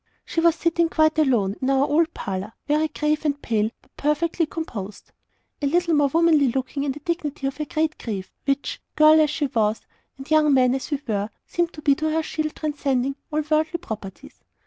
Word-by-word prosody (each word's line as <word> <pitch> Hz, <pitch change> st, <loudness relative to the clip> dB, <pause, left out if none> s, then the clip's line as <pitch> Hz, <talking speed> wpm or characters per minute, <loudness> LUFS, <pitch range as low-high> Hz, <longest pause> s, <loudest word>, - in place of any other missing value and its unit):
She -, -, -2 dB
was 335 Hz, -1 st, +4 dB
sitting 335 Hz, 0 st, +1 dB
quite 315 Hz, -1 st, +2 dB
alone, 225 Hz, -9 st, +2 dB
in 260 Hz, -, 0 dB
our 270 Hz, 0 st, +3 dB
old 325 Hz, +3 st, +2 dB
parlour, 195 Hz, +1 st, -4 dB
very 305 Hz, +1 st, +2 dB
grave 300 Hz, 0 st, -1 dB
and 290 Hz, -2 st, 0 dB
pale, 220 Hz, -4 st, 0 dB
but -, -, -30 dB
perfectly 310 Hz, +3 st, 0 dB
composed. 210 Hz, -, -7 dB, 0.5 s
A 285 Hz, -, +1 dB
little 340 Hz, +3 st, +2 dB
more 290 Hz, -2 st, +4 dB
womanly 320 Hz, -1 st, +4 dB
looking 265 Hz, +3 st, -2 dB
in 285 Hz, -, 0 dB
the 295 Hz, -, -10 dB
dignity 300 Hz, -3 st, -3 dB
of 270 Hz, +1 st, -2 dB
her 305 Hz, -, -3 dB
great 310 Hz, +1 st, -1 dB
grief, 200 Hz, -5 st, -5 dB
which, 275 Hz, 0 st, -1 dB
girl 310 Hz, +1 st, +7 dB
as 305 Hz, -, +3 dB
she 300 Hz, 0 st, -1 dB
was, 220 Hz, -5 st, 0 dB, 0.4 s
and 270 Hz, +3 st, -11 dB
young 305 Hz, -2 st, +5 dB
men 255 Hz, -1 st, +4 dB
as 265 Hz, -, -3 dB
we 290 Hz, -3 st, -1 dB
were, 205 Hz, -1 st, -1 dB, 0.2 s
seemed 345 Hz, -1 st, -1 dB
to 305 Hz, -, -10 dB
be 285 Hz, -, +5 dB
to 310 Hz, +3 st, -1 dB
her 320 Hz, +1 st, +1 dB
a -, -, -9 dB
shield 310 Hz, -1 st, -3 dB
transcending 275 Hz, -3 st, -1 dB, 0.2 s
all 305 Hz, 0 st, +1 dB
worldly 310 Hz, +2 st, +1 dB
"proprieties." 215 Hz, -, -9 dB
295 Hz, 205 wpm, -23 LUFS, 260-315 Hz, 0.5 s, girl